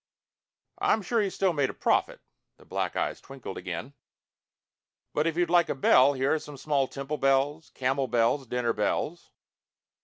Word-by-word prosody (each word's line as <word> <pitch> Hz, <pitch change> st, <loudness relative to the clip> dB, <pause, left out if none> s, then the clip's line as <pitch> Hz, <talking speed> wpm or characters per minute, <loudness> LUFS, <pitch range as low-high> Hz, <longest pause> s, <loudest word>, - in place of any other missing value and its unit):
"I'm 220 Hz, -, +2 dB
sure 230 Hz, +4 st, +1 dB
he 200 Hz, -, 0 dB
still 190 Hz, -1 st, 0 dB
made 145 Hz, -4 st, +1 dB
a -, -, -7 dB
profit." -, -, +1 dB, 0.4 s
The -, -, -19 dB
black -, -, -3 dB
eyes -, -, -2 dB
twinkled 135 Hz, -7 st, -9 dB
again. 90 Hz, +8 st, -6 dB, 1.2 s
"But 150 Hz, +2 st, +1 dB
if 165 Hz, 0 st, -2 dB
you'd 175 Hz, -1 st, +1 dB
like 175 Hz, -1 st, +4 dB
a -, -, -1 dB
bell, 135 Hz, +1 st, +5 dB
here 135 Hz, +2 st, +1 dB
are 160 Hz, -, +1 dB
small 145 Hz, -1 st, -1 dB
temple 140 Hz, +3 st, -5 dB
bells, 135 Hz, +3 st, +1 dB
camel 130 Hz, +1 st, 0 dB
bells, 120 Hz, +3 st, +1 dB
dinner 120 Hz, -1 st, 0 dB
bells...." 155 Hz, +10 st, -2 dB
140 Hz, 160 wpm, -28 LUFS, 130-160 Hz, 1.2 s, bell